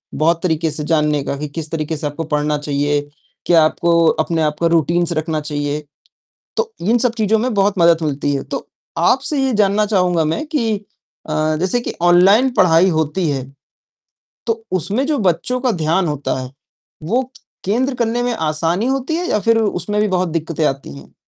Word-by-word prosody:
बहुत 165 Hz, +2 st, +1 dB
तरीके 160 Hz, -2 st, 0 dB
से 150 Hz, 0 st, -4 dB
जानने 150 Hz, -2 st, +1 dB
का 140 Hz, -, -3 dB
कि 150 Hz, +2 st, -4 dB
किस 155 Hz, +1 st, -6 dB
तरीके 160 Hz, -1 st, -2 dB
से 150 Hz, -, -3 dB
आपको 145 Hz, +3 st, -5 dB
पढ़ना 150 Hz, -1 st, 0 dB
चाहिए? 145 Hz, 0 st, 0 dB, 0.4 s
क्या 165 Hz, -2 st, +5 dB
आपको 170 Hz, +1 st, +2 dB, 0.2 s
अपने 165 Hz, 0 st, -1 dB
आप 150 Hz, -1 st, 0 dB
का 170 Hz, -, +4 dB
रूटीन्स 170 Hz, +1 st, +1 dB
रखना 155 Hz, 0 st, -1 dB
चाहिए? 145 Hz, 0 st, -3 dB, 0.7 s
तो 455 Hz, -1 st, -1 dB
इन 225 Hz, +7 st, +2 dB
सब 240 Hz, -1 st, +2 dB
चीज़ों 220 Hz, 0 st, +2 dB
में 245 Hz, +2 st, -1 dB
बहुत 200 Hz, 0 st, +2 dB
मदद 170 Hz, -1 st, +4 dB
मिलती 145 Hz, -1 st, -1 dB
है। 135 Hz, -, -3 dB
तो -, -, -6 dB, 0.3 s
आपसे 295 Hz, -4 st, +1 dB
ये 260 Hz, -, 0 dB
जानना 210 Hz, 0 st, +2 dB
चाहूँगा 180 Hz, -5 st, +1 dB
मैं 160 Hz, -, -2 dB
कि 240 Hz, -9 st, 0 dB, 0.5 s
अ, 155 Hz, 0 st, 0 dB
जैसे 185 Hz, +7 st, +1 dB
कि -, -, -5 dB
ऑनलाइन 190 Hz, +8 st, +5 dB
पढ़ाई 180 Hz, -4 st, +4 dB
होती 160 Hz, +1 st, 0 dB
है। 135 Hz, -2 st, -2 dB, 1.0 s
तो 225 Hz, -1 st, -1 dB
उसमें 200 Hz, -, 0 dB
जो 300 Hz, -1 st, +1 dB
बच्चों 190 Hz, +6 st, 0 dB
का 255 Hz, -1 st, +2 dB
ध्यान 170 Hz, 0 st, 0 dB
होता 145 Hz, -3 st, -2 dB
है, 130 Hz, 0 st, -8 dB, 0.5 s
वो 225 Hz, +11 st, +1 dB, 0.4 s
केंद्र 250 Hz, +7 st, 0 dB
करने 235 Hz, 0 st, 0 dB
में 245 Hz, 0 st, 0 dB
आसानी 165 Hz, +2 st, -1 dB
होती 270 Hz, +4 st, -1 dB
है 350 Hz, +2 st, -2 dB
या -, -, +1 dB
फ़िर 230 Hz, +2 st, +2 dB
उसमें 210 Hz, -1 st, -1 dB
भी 210 Hz, -, +2 dB
बहुत 185 Hz, -1 st, 0 dB
दिक्कतें 160 Hz, -1 st, -2 dB
आती 135 Hz, -, -3 dB
हैं? 70 Hz, -, -15 dB
170 Hz, 185 wpm, -18 LUFS, 155-215 Hz, 1.0 s, क्या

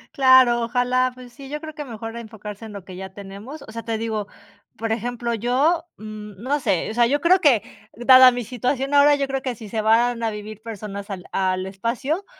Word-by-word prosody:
Claro, 260 Hz, -3 st, +6 dB
ojalá, 250 Hz, +2 st, +1 dB
pues 250 Hz, -1 st, -13 dB
sí, 275 Hz, 0 st, -11 dB
yo 300 Hz, -, -4 dB
creo 315 Hz, 0 st, -8 dB
que 295 Hz, -1 st, -7 dB
mejor 225 Hz, -2 st, -7 dB
enfocarse 220 Hz, -2 st, -9 dB
en 220 Hz, -, -9 dB
lo 200 Hz, -3 st, -9 dB
que 185 Hz, -, -10 dB
ya 190 Hz, +1 st, -7 dB
tenemos. 200 Hz, +9 st, -10 dB
O 220 Hz, -, -12 dB
sea, 230 Hz, +1 st, -6 dB
te 225 Hz, -1 st, -3 dB
digo, 220 Hz, -2 st, -3 dB, 0.5 s
por 225 Hz, 0 st, -3 dB
ejemplo, 235 Hz, +1 st, -2 dB
yo, 270 Hz, +9 st, +1 dB
no 215 Hz, +5 st, -4 dB
sé, 195 Hz, -6 st, 0 dB
o -, -, -6 dB
sea, 235 Hz, 0 st, +4 dB
yo 285 Hz, +4 st, +1 dB
creo 360 Hz, +3 st, +4 dB
que 270 Hz, -, +4 dB, 0.3 s
dada 255 Hz, +1 st, +8 dB
mi 245 Hz, -1 st, -3 dB
situación 255 Hz, +4 st, -2 dB
ahora, 285 Hz, +1 st, +6 dB
yo 280 Hz, -1 st, -1 dB
creo 270 Hz, 0 st, -2 dB
que 255 Hz, -3 st, -3 dB
si 215 Hz, -1 st, -10 dB
se 220 Hz, +1 st, -2 dB
van 230 Hz, +2 st, +3 dB
a 225 Hz, -, 0 dB
vivir 210 Hz, 0 st, -8 dB
personas 210 Hz, -2 st, -7 dB
al 185 Hz, -3 st, -6 dB
al 185 Hz, -1 st, 0 dB
espacio, 235 Hz, -, -3 dB
235 Hz, 215 wpm, -22 LUFS, 215-260 Hz, 0.5 s, dada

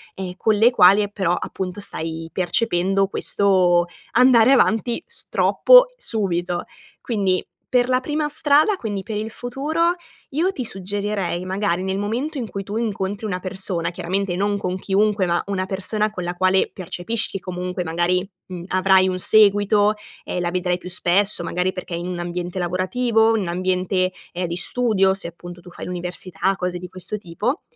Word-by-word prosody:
ehm, 185 Hz, -2 st, -5 dB
con 220 Hz, -, +2 dB
le 225 Hz, +4 st, +5 dB
quali, 195 Hz, -2 st, +6 dB
ehm, 205 Hz, -, -2 dB
però, 185 Hz, -4 st, 0 dB
appunto, 180 Hz, +1 st, -4 dB
stai 165 Hz, -4 st, -3 dB
percependo 195 Hz, 0 st, +1 dB
questo 185 Hz, -4 st, +2 dB, 0.3 s
andare 250 Hz, 0 st, +5 dB
avanti, 240 Hz, +2 st, +2 dB
s 470 Hz, 0 st, -8 dB
troppo, -, -, +6 dB
subito. 180 Hz, -, -1 dB, 0.4 s
Quindi, 195 Hz, -6 st, 0 dB, 0.2 s
per 250 Hz, -1 st, +2 dB
la 255 Hz, 0 st, +3 dB
prima 300 Hz, +2 st, -1 dB
strada, 305 Hz, +5 st, +3 dB
quindi 210 Hz, -, -4 dB
per 215 Hz, +3 st, -6 dB
il 220 Hz, +1 st, -4 dB
futuro, 315 Hz, +9 st, -1 dB, 0.4 s
io 335 Hz, +7 st, +1 dB
ti 265 Hz, -, -5 dB
suggerirei, 195 Hz, -2 st, -2 dB
magari, 185 Hz, -1 st, -1 dB
nel 190 Hz, 0 st, -2 dB
momento 245 Hz, +9 st, -3 dB
in 235 Hz, -4 st, -4 dB
cui 200 Hz, -, -5 dB
tu 205 Hz, +2 st, -7 dB
incontri 205 Hz, -2 st, -3 dB
una 180 Hz, -4 st, -2 dB
persona, 185 Hz, -2 st, -1 dB
chiaramente 180 Hz, +1 st, -2 dB
non 200 Hz, +2 st, 0 dB
con 185 Hz, -2 st, -3 dB
chiunque 200 Hz, +1 st, +1 dB
ma 170 Hz, -1 st, +1 dB
una 190 Hz, -2 st, -2 dB
persona 210 Hz, +3 st, 0 dB
con 180 Hz, -4 st, -6 dB
la 175 Hz, -, -2 dB
quale 185 Hz, +1 st, +2 dB
percepisci 195 Hz, +3 st, -4 dB
comunque 180 Hz, 0 st, -4 dB
magari, 175 Hz, +3 st, 0 dB, 0.2 s
mhmm, 180 Hz, -2 st, -7 dB
avrai 190 Hz, 0 st, +4 dB
un 185 Hz, -, -1 dB
seguito, 205 Hz, +1 st, +4 dB, 0.3 s
ehm, 180 Hz, -, -3 dB
la 175 Hz, 0 st, -1 dB
vedrai 180 Hz, 0 st, 0 dB
più 180 Hz, -, -9 dB
spesso, 185 Hz, +2 st, +2 dB
magari 180 Hz, +2 st, -1 dB
perché 180 Hz, -1 st, -7 dB
è -, -, -3 dB
in 175 Hz, +1 st, -5 dB
un 180 Hz, -1 st, -4 dB
ambiente 175 Hz, +1 st, -4 dB
lavorativo? 220 Hz, +6 st, +1 dB
In -, -, -1 dB
un 180 Hz, -, -5 dB
ambiente, 185 Hz, +1 st, 0 dB, 0.2 s
ehm, 180 Hz, 0 st, -2 dB
di 170 Hz, -, -4 dB
studio, 200 Hz, -3 st, +2 dB
se 190 Hz, -2 st, -2 dB
appunto 175 Hz, +1 st, -11 dB
tu 180 Hz, -, -13 dB
fai -, -, -8 dB
l'università, 180 Hz, +1 st, -3 dB
cose 180 Hz, 0 st, -2 dB
di 180 Hz, +1 st, -8 dB
questo 185 Hz, +3 st, -5 dB
tipo 210 Hz, -, -3 dB
190 Hz, 175 wpm, -21 LUFS, 180-215 Hz, 0.4 s, quali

